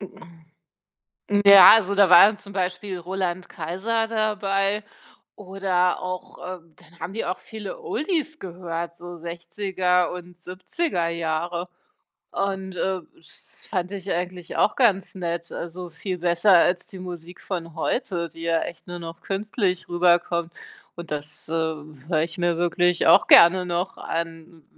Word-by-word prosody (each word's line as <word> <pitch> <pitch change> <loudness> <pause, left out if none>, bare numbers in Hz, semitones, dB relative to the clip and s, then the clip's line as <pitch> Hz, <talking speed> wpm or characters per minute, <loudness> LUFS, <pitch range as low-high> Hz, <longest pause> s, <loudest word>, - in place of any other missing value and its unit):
M 165 -4 -14 0.9
ja, 200 -1 +11
also 200 -3 +2
da 200 -2 +5
war 180 +3 +9
dann 215 -1 -2
zum 200 -1 -13
Beispiel 185 0 -3
Roland 185 0 -3
Kaiser 195 +8 -2
dabei 210 -2 0 0.5
oder 185 -2 0
auch, 185 0 -6 0.2
ähm 165 -2 -25
dann 170 +1 -20
haben 180 +4 -6
die 225 - -3
auch 180 - -3
viele 220 - -8
Oldies 325 -7 -2
gehört, 170 -2 -5
so 175 0 -10
60er 180 +1 -1
und 180 -1 -9
70er 180 - -3
Jahre 170 +2 -3 0.6
und, 190 -1 -3
äh, 185 0 -1
das 160 - -15
fand 180 0 -2
ich 195 -1 -5
eigentlich 180 0 -4
auch 210 - +2
ganz 200 -7 +2
nett, 170 -2 -4
also 175 +1 -7
viel 180 +3 -5
besser 175 +2 +4
als 175 +1 +2
die 190 - -10
Musik 175 -1 -9
von 170 -4 -5
heute, 170 -1 -2
die 165 - -13
ja 165 0 +1
echt 175 - -7
nur 175 - -6
noch 165 0 -9
künstlich 195 -2 -2
rüberkommt. 175 -1 +2 0.4
Und 170 -1 -9
das, 150 0 -5
äh, - - -7
höre 155 -1 -2
ich 165 +1 -5
mir 175 -1 +1
wirklich 175 0 +1
auch - - +7
gerne 180 +2 +7
noch 175 +2 -3
an, 165 -1 -6
180 Hz, 150 wpm, -24 LUFS, 170-195 Hz, 0.9 s, ja